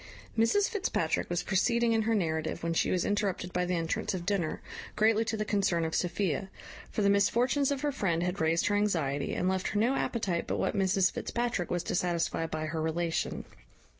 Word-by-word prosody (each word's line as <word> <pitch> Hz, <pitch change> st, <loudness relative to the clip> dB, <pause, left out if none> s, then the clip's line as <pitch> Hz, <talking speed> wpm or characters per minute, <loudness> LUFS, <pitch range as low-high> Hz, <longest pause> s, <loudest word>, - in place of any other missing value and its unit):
Mrs 230 Hz, -, +3 dB
Fitzpatrick 375 Hz, -, -1 dB
was 175 Hz, 0 st, -1 dB
proceeding 235 Hz, +4 st, +2 dB
in 225 Hz, -, +2 dB
her 225 Hz, +1 st, +1 dB
narrative 160 Hz, -5 st, -1 dB
when 165 Hz, 0 st, 0 dB
she -, -, +1 dB
was 180 Hz, -, +1 dB
interrupted 200 Hz, -3 st, -1 dB
by 180 Hz, 0 st, +1 dB
the 180 Hz, 0 st, 0 dB
entrance 165 Hz, +3 st, -1 dB
of 175 Hz, -2 st, -5 dB
dinner, 185 Hz, -5 st, -1 dB, 0.4 s
greatly 220 Hz, +1 st, +3 dB
to 220 Hz, 0 st, -2 dB
the 215 Hz, -, -1 dB
concern 195 Hz, -5 st, +1 dB
of 160 Hz, -, -3 dB
Sophia; 185 Hz, 0 st, -1 dB, 0.4 s
for 210 Hz, -, -1 dB
the 200 Hz, -, +4 dB
misfortunes 240 Hz, +7 st, +2 dB
of 280 Hz, -2 st, -1 dB
her 295 Hz, -, 0 dB
friend 175 Hz, -10 st, 0 dB
had 180 Hz, +1 st, -2 dB
raised 160 Hz, +1 st, +2 dB
her 205 Hz, -, +2 dB
anxiety, 165 Hz, -9 st, 0 dB
and 180 Hz, -, 0 dB
left 185 Hz, 0 st, 0 dB
her 205 Hz, -, -1 dB
no 235 Hz, +5 st, +3 dB
appetite 200 Hz, -10 st, -1 dB
but -, -, -1 dB
what -, -, 0 dB
Mrs 190 Hz, -1 st, +3 dB
Fitzpatrick 235 Hz, -7 st, -2 dB
was 175 Hz, 0 st, -1 dB
to -, -, -3 dB
satisfy 170 Hz, -2 st, 0 dB
by 155 Hz, -1 st, -3 dB
her 155 Hz, 0 st, -3 dB
relation. 165 Hz, +1 st, -1 dB
190 Hz, 200 wpm, -30 LUFS, 170-220 Hz, 0.4 s, the